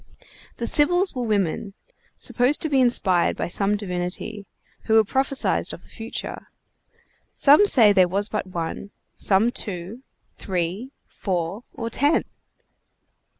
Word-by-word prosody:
The 235 - -3
Sibyls 355 +9 +3
were 255 - -4
women, 200 -1 -1 0.4
supposed 255 +4 +1
to 315 - -1
be 270 -2 +3
inspired 190 -8 +2
by - - -2
some 200 +3 +1
divinity, 190 +2 -5 0.4
who 220 0 +4
prophesied 265 +5 0
of - - -11
the - - -20
future. 225 0 -7 0.9
Some 300 +9 +5
say 220 - +6
there 185 -2 +4
was 200 +3 0
but 215 -3 -4
one; 175 +2 -5 0.3
some 210 +4 +2
two, 200 +2 -5 0.4
three, 185 +6 -3 0.2
four, 185 +3 -4
or 230 0 -5
ten. 290 +7 +2
210 Hz, 125 wpm, -23 LUFS, 185-250 Hz, 0.9 s, say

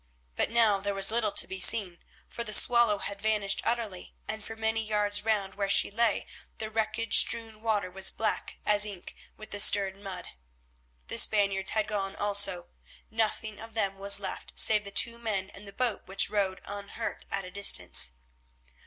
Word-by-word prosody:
But - - -1
now 225 -3 +2
there 200 0 -3
was 195 +1 +4
little 225 -2 +2
to - - +4
be 190 - -7
seen, 185 -2 +1 0.3
for 235 - -6
the 215 -2 -4
Swallow 235 -4 +4
had 200 0 -7
vanished 210 -2 -1
utterly, 225 -6 -4
and 220 -1 -4
for 225 - -8
many 225 0 -2
yards 210 -1 -1
round 205 -3 -1
where 200 -1 -3
she 200 - +2
lay 230 0 0 0.3
the 220 0 -6
wreckage 220 +1 +3
strewn 225 -2 +1
water 210 -4 -1
was 190 +1 +3
black 220 - -3
as 205 -1 +4
ink 200 -4 -7 0.2
with 215 - -12
the 205 - -5
stirred 195 -1 +4
mud. 195 -2 -9 0.8
The - - +3
Spaniards 195 -2 +3
had 215 -1 -1
gone 195 -2 -4
also, 200 -3 +2 0.4
nothing 220 -1 -2
of 225 0 -12
them 195 -3 -2
was 200 0 +4
left, 195 - -7
save 210 -1 +4
the - - -7
two 235 +3 +2
men 200 -4 -3
and 200 +1 -13
the - - -10
boat 240 +1 -3
which 195 +1 +1
rode 195 -3 -2
unhurt 200 0 -7
at 195 -1 -4
a 180 - -10
distance. 90 - +2
205 Hz, 180 wpm, -28 LUFS, 195-220 Hz, 0.8 s, was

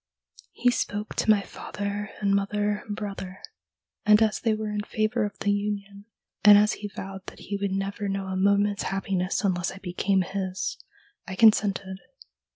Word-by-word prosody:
He 245 0 +3
spoke 210 -3 -2
to - - 0
my 205 -2 +5
father 205 +1 -5
and 200 -1 +1
mother 205 +1 0
and 205 - -3
brother, 195 -2 -6 0.6
and 210 0 +6
as 220 -1 +2
they 225 -3 +1
were 215 0 -3
in 210 0 -1
favour 215 0 0
of 205 - -6
the 205 - +2
union, 200 0 -3 0.4
and 205 -1 +10
as 210 +1 +4
he 210 - -5
vowed 195 -1 -8
that - - -9
he 200 0 -4
could 200 0 0
never 195 +2 -2
know 195 0 -2
a 190 0 -4
moment's 200 +1 +2
happiness 195 0 -1
unless 180 -3 0
I - - -10
became 190 +1 0
his, 190 0 -3 0.5
I 190 - -5
consented. 200 -3 +3
200 Hz, 170 wpm, -26 LUFS, 195-210 Hz, 0.6 s, and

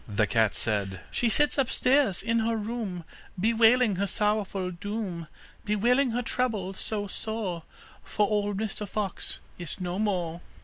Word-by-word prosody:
The 105 0 +2
cat 110 -2 +2
said: 100 -4 -1
'She 240 - +2
sits 295 +4 +3
upstairs 255 -5 +2
in 230 +1 +2
her 225 0 +1
room, 210 -5 -4 0.4
Bewailing 225 0 +4
her 200 +1 0
sorrowful 205 -3 0
doom, 185 -2 -4 0.4
Bewailing 240 +6 +3
her 245 +2 -1
trouble 220 -7 -1
so 205 +2 -3
sore, 205 -4 -4 0.4
For 210 - +1
old 205 -1 0
Mr 210 -1 -3
Fox 200 -3 -3 0.2
is 175 +2 -5
no 180 +1 -3
more. 175 -5 -1
210 Hz, 140 wpm, -28 LUFS, 180-230 Hz, 0.4 s, Bewailing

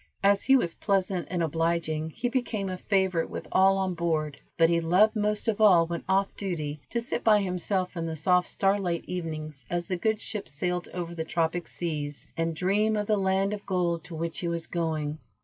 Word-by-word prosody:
As 200 0 +4
he 270 - +6
was 175 -10 +2
pleasant 190 -3 0
and 175 -2 0
obliging 160 0 0
he 230 +9 -3
became 235 -6 -1
a 185 - -4
favorite 190 -5 +1
with - - -6
all 195 +1 +5
on 190 -1 0
board, 155 -4 -1 0.2
but 165 -1 +6
he 170 0 +2
loved 185 +7 +4
most 210 +1 0
of 220 -1 0
all 180 -6 +7
when 170 0 -4
off 195 +1 +2
duty, 155 -7 -4
to 235 - -1
sit 240 +1 -3
by 215 -2 +6
himself 185 0 -1
in 165 -1 -2
the 160 - -3
soft 180 +3 +2
starlit 195 -3 0
evenings 155 -6 -5
as 175 0 -2
the 185 - -1
good 220 +4 0
ship 210 -2 -5
sailed 180 +4 -2
over 170 -1 -4
the 165 -1 -3
tropic 165 +1 -1
seas, 150 -4 -4
and 165 0 -1
dream 205 +6 +2
of 210 - -1
the 215 - +2
land 195 0 +1
of 205 -1 -5
gold 175 -3 0
to 175 - -8
which 165 +1 -3
he 180 - -2
was 170 -1 -2
going. 155 -3 -2
180 Hz, 205 wpm, -27 LUFS, 165-195 Hz, 0.2 s, all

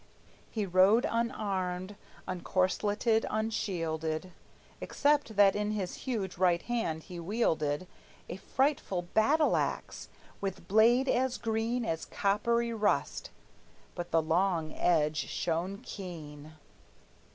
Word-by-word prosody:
He 215 -3 -2
rode 190 +5 +4
unarmed, 195 -5 -2 0.3
uncorsleted, 205 +5 +1
unshielded, 170 -6 -2 0.5
Except 285 -6 +1
that 200 -1 +6
in 210 0 -1
his 190 -4 -3 0.2
huge 195 -8 -3
right 175 -2 +3
hand 225 -10 -2
he 180 -2 -8
wielded 165 -5 0 0.4
A - - -6
frightful 260 -7 0
battle 275 - +3
axe, - - -3 0.3
with 190 -3 -4
blade 235 +6 +4
as 255 0 +1
green 225 +2 -1
As 165 -6 -2
coppery 235 +4 0
rust; 215 -2 0 0.6
but 175 -1 -5
the 165 0 +2
long 165 -1 +1
edge 155 -3 +2
shone 175 +4 -2
keen. 155 - -8
195 Hz, 105 wpm, -30 LUFS, 175-225 Hz, 0.6 s, that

